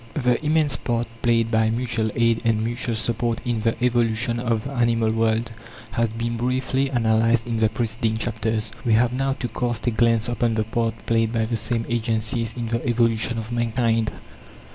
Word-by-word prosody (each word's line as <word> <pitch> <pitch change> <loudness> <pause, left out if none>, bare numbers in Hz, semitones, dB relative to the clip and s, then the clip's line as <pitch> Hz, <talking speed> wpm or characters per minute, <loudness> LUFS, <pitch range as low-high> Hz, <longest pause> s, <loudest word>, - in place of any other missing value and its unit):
The 125 -1 +1
immense 150 -3 +2
part 120 -1 -1 0.2
played 115 -1 +2
by 110 -1 +3
mutual 115 -1 0
aid 115 -1 +2
and 110 -2 +1
mutual 120 0 -2
support 115 +1 0
in 120 -3 -1
the 115 +1 +1
evolution 120 0 +1
of 115 -3 0
the 135 - -6
animal 115 -3 +1
world 115 +1 +1 0.4
has 115 0 +1
been 115 +1 -3
briefly 130 +2 0
analyzed 115 -2 +2
in 115 -2 -2
the 110 -1 +3
preceding 110 0 -1
chapters. 110 -1 -2
We 115 - +2
have 120 +2 +3
now 135 +1 0
to 130 - -4
cast 120 -2 -3
a 120 - +2
glance 115 -1 +2
upon 120 -1 0
the 110 - +1
part 115 +1 -1
played 115 -1 +1
by 115 -1 0
the 115 +1 -2
same 115 +1 -2
agencies 115 0 -1
in 115 -2 -3
the 115 +1 -1
evolution 115 -1 +1
of 115 +1 -5
mankind. 115 -1 +1
115 Hz, 185 wpm, -23 LUFS, 110-120 Hz, 0.4 s, by